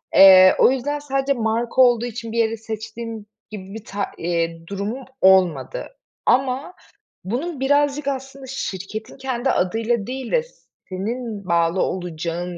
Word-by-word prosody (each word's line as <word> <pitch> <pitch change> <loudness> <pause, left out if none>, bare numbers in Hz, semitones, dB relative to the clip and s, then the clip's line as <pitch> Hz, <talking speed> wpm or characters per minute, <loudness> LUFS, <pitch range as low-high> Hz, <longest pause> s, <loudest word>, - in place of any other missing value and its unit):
Eee, 185 -1 +9
o - - +6
yüzden 290 +3 -2
sadece 275 -1 0
marka 230 +2 0
olduğu 240 -2 +4
için 230 -1 -6
bir 235 - -4
yere 225 0 +1
seçtiğim 220 0 -7 0.3
gibi 195 -2 -8
bir 220 0 -9
ta 200 0 -3
eee, 165 -1 -2
durumum 205 +7 -4 0.2
olmadı 190 - +3 0.4
ama 265 +6 +1 0.5
bunun 265 - -3
birazcık 285 +1 +2
aslında 270 0 -6
şirketin 215 -2 -6
kendi 265 -1 -2
adıyla 225 +3 0
değil 260 0 -5
de 485 -1 +2 0.5
senin 210 +2 -4
bağlı 170 +1 +2
olacağın 175 0 -3
225 Hz, 135 wpm, -22 LUFS, 190-265 Hz, 0.5 s, Eee